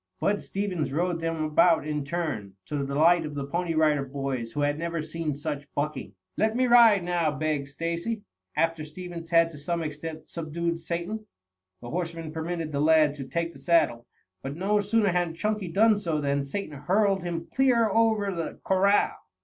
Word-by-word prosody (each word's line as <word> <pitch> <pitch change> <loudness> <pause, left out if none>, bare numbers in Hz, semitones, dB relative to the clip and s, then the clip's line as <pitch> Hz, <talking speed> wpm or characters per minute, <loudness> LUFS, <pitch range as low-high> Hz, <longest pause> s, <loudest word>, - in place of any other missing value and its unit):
Bud 205 0 +1
Stevens 190 -7 -2
rode 170 +3 0
them 165 -1 -2
about 155 +1 +4
in 150 -1 -2
turn, 145 - -3
to 150 - -5
the 140 -1 -1
delight 165 +5 +4
of 150 -1 -6
the 140 -1 -3
Pony 170 +3 -2
Rider 155 -3 +3
Boys 135 -4 -4
who 145 - -2
had 145 +1 +1
never 170 0 -2
seen 155 0 -3
such 145 -1 -5
bucking. 145 -9 -3 0.2
"Let 220 +1 +2
me 255 +1 +3
ride 230 -6 +6
now," 175 -2 +1
begged 150 -1 -1
Stacy, 170 +9 -3 0.3
after 165 -1 +1
Stevens 170 +1 -8
had 165 -1 +4
to 150 - -10
some 170 +3 -2
extent 155 +1 -6
subdued 170 +1 -3
Satan. 175 +6 -4 0.5
The 120 - -8
horseman 165 -2 -3
permitted 160 0 -3
the 140 -1 -1
lad 155 -1 +5
to 140 -2 -7
take 170 +3 -1
to - - -14
the - - -15
saddle, 160 -9 +2 0.3
but 135 +1 -5
no 200 +5 +1
sooner 205 0 +2
had 175 -2 0
Chunky 210 +1 -1
done 210 +4 +4
so, 165 -6 -1
than 140 -1 0
Satan 155 +2 -5
hurled 195 +5 +2
him 170 -1 -4
clear 250 -4 +4
over 215 -2 +2
the 165 -2 -4
corral. 195 +2 +3
165 Hz, 185 wpm, -27 LUFS, 150-180 Hz, 0.5 s, ride